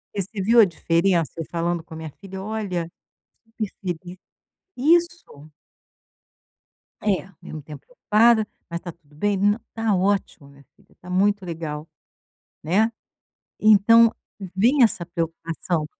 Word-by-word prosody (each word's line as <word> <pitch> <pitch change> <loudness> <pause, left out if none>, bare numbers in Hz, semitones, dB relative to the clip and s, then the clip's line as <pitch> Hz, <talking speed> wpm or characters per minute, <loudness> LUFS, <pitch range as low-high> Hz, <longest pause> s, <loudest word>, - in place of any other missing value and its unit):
Você 200 +1 -3
viu 230 +4 +4
a 215 - +9
diferença 170 -1 0
falando 170 0 -1
com 165 - -13
a - - -7
minha 160 -2 -7
filha, 190 -1 -8
olha, 190 -5 -3 0.7
feliz 185 -4 -5 0.6
isso. 320 - 0 1.5
É, 200 -3 +1
ao 195 -3 -20
mesmo 155 - -8
tempo 145 -1 -11
preocupada, 225 -2 +3 0.2
mas 170 0 -4
está 175 - -7
tudo 150 -3 -25
bem, 205 +4 0
nã 205 +2 +3 0.2
tá 225 -3 0
ótimo 185 -6 -1
minha 140 0 -19
filha, - - -27
tá 180 - -13
muito 200 +1 +1
legal, 160 -2 -5 0.8
né, 210 +8 +2 0.7
então 220 +2 +6 0.4
vem 245 +8 +4
essa 180 -7 +2
preocupação. 165 -1 -3
185 Hz, 130 wpm, -23 LUFS, 165-215 Hz, 1.5 s, a